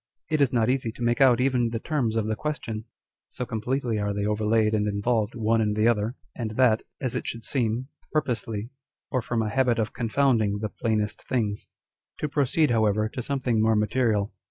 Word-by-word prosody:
It 155 -2 +2
is 140 - +4
not 115 -3 +2
easy 125 -3 0
to 120 - -6
make 120 +2 +1
out 125 -3 +6
even 125 -2 +2
the 115 - -2
terms 120 -3 -1
of 110 -2 +1
the 110 0 -1
question, 115 -6 -4 0.4
so 125 - -5
completely 115 +1 -1
are 105 0 -1
they 100 0 -1
overlaid 105 +1 +2
and 105 -1 +1
involved 105 +2 0
one 115 0 +2
in 105 -1 +1
the 110 +1 +3
other, 115 +1 +1 0.2
and 110 -3 -4
that, 120 -4 +4 0.2
as 130 -2 -2
it 125 - -3
should 115 -1 -5
seem, 120 -1 -1 0.2
purposely, 115 -6 -2 0.4
or 130 - +1
from 115 0 -1
a 105 - -1
habit 130 -3 +2
of 110 -2 -1
confounding 115 -3 +2
the 105 +1 -3
plainest 110 -1 -1
things. 105 -5 -1 0.5
To 150 - -2
proceed, 145 0 +2
however, 110 -1 +2
to 125 - -5
something 125 -4 0
more 110 0 +3
material. 105 -1 +1
115 Hz, 195 wpm, -26 LUFS, 110-125 Hz, 0.5 s, out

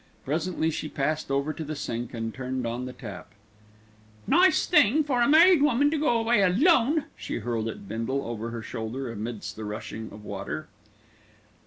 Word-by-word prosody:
Presently 160 +2 -1
she 155 - -4
passed 155 +1 -2
over 140 +3 0
to 160 - -6
the 155 0 -5
sink 120 -4 -4
and 115 -1 -4
turned 130 -1 -4
on 120 +2 -3
the 130 - -6
tap. 105 -6 -9 1.0
"Nice 360 +4 +4
thing 305 - +4
for 260 -4 0
a 235 - +4
married 330 +2 +7
woman 290 0 +3
to 315 - 0
go 290 -6 +2
away 225 -2 +3
alone," 280 - +4
she - - -5
hurled 115 -1 -2
at 110 -3 -7
Bindle 115 +6 -2
over 115 0 -4
her 115 -1 -6
shoulder, 120 +3 -5
amidst 110 0 -5
the 110 - -6
rushing 110 +1 -6
of 105 +1 -12
water. 100 +10 -5
135 Hz, 175 wpm, -27 LUFS, -, 1.0 s, married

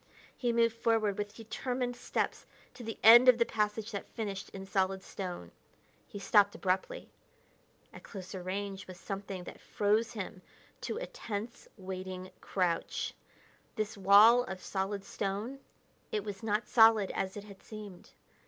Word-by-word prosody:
He 240 -2 0
moved 230 -1 +3
forward 225 -3 +1
with 205 0 -4
determined 245 +2 -3
steps 240 - -2 0.3
to 250 -1 -10
the 225 -1 -5
end 240 +3 +10
of 250 - +7
the 235 - +3
passage 210 0 -1
that 200 - -5
finished 200 -4 -4
in 195 0 -8
solid 190 0 0
stone. 180 - -6 0.6
He - - -9
stopped 205 0 +4
abruptly. 200 - -2 0.8
At - - -11
closer 190 -2 -8
range 195 +1 -4
was 185 -1 -10
something 195 -2 -5
that - - -10
froze 215 +3 +1
him 190 -3 -6 0.5
to - - -2
a - - -3
tense, 235 - -6
waiting 185 -1 -6
crouch. 180 -3 -1 0.6
This 215 0 -2
wall 205 +5 +7
of 190 -4 -7
solid 195 +1 -2
stone 205 +9 -4 0.5
it 210 - -1
was 205 -1 -6
not 215 0 0
solid 225 -4 +6
as 190 +1 -3
it 205 - -6
had 200 -2 -13
seemed. 210 -4 -10
205 Hz, 150 wpm, -32 LUFS, 190-225 Hz, 0.8 s, end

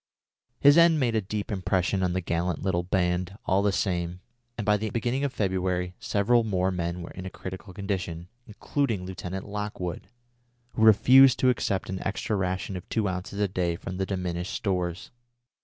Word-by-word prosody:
His 145 +3 +7
end 170 -2 +6
made 120 -4 +1
a 110 - +2
deep 105 +3 -4
impression 95 0 0
on 90 -1 +1
the 95 - -1
gallant 85 0 -2
little 95 -2 +1
band, 90 +1 -1
all 95 +1 +2
the 100 0 +2
same, 90 -2 -1 0.4
and 110 - -3
by 105 - +4
the 110 +1 -2
beginning 120 +4 -1
of 140 - 0
February 90 -4 -1
several 115 +4 +2
more 95 -3 0
men 85 -1 -3
were - - -8
in 95 0 -7
a - - -4
critical 95 +2 -8
condition, 90 -4 -4 0.2
including 110 -2 -2
Lieutenant 95 +1 -6
Lockwood, 100 -4 -4 0.6
who 110 - -5
refused 125 +4 +7
to 130 - +4
accept 100 -5 -1
an 95 0 -4
extra 100 +2 -2
ration 95 0 -2
of 90 - -8
two 110 -3 0
ounces 95 +2 -4
a 105 - +2
day 90 -2 -1
from 90 +2 -6
the 95 0 -1
diminished 90 -1 -3
stores. 90 -2 -2
95 Hz, 180 wpm, -27 LUFS, 90-105 Hz, 0.6 s, His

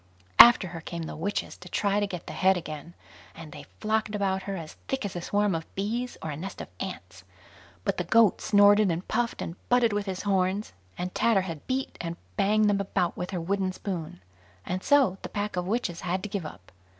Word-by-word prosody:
After 235 -6 +9
her 170 -1 -7
came 170 0 -5
the - - -6
witches 200 +6 -3
to 180 - -12
try 200 +2 +1
to 205 - 0
get 180 -4 -6
the - - -7
head 190 0 +3
again, 160 0 -7 0.4
and 160 -2 -10
they - - -10
flocked 215 0 0
about 190 -2 0
her 195 - -2
as 160 -4 -7
thick 265 -4 -2
as 195 - -5
a 175 - -3
swarm 205 +2 +1
of 165 -1 -5
bees 235 +6 -2
or 155 - -3
a - - -4
nest 190 +6 -7
of - - -7
ants; 95 - -7 0.6
but - - -1
the 180 - 0
goat 215 +3 +4
snorted, 205 0 +5
and 170 +2 -2
puffed, 235 +1 -1
and 165 - -6
butted 245 -3 +4
with 205 0 -2
his 185 -1 -3
horns, 195 +1 0 0.2
and 180 +1 -4
Tatterhood 190 -8 +1
beat 265 +1 -2
and 170 0 -4 0.2
banged 210 +1 +3
them 200 -1 +2
about 185 -3 -1
with 180 - -4
her 185 - -3
wooden 190 +2 -1
spoon; 170 - -5 0.4
and 185 +1 -2
so 260 -9 +3
the - - -6
pack 205 -1 -3
of 180 0 -2
witches 200 -5 -1
had 185 0 -2
to 210 - -4
give 195 -4 -3
it - - -2
up. 90 -11 -13
190 Hz, 220 wpm, -27 LUFS, 175-210 Hz, 0.6 s, After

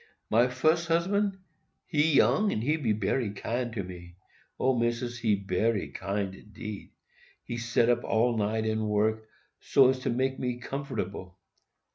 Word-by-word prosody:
"My 120 +3 +5
fus 155 +7 +1
husband,—he 170 -4 -1
young, 210 +8 +4
and 110 - -2
he 150 +5 +2 0.2
bery 105 +3 0
kind 120 +4 -3
to 100 -4 -3
me,—O, 90 +8 -5
Missis, 120 +1 -1
he 110 -3 +2
bery 100 +2 0
kind 100 -1 -3
indeed. 105 +1 -9 0.5
He 120 - -5
set 120 0 +1
up 120 0 +2
all 115 +2 +2
night 110 +1 0
and 110 -1 -1
work, 110 +1 0 0.3
so 135 -2 +5
as 130 - -3
to - - -2
make 130 +2 0
me 125 -1 -2
comfortable. 120 -9 -5
120 Hz, 140 wpm, -28 LUFS, 105-130 Hz, 0.5 s, My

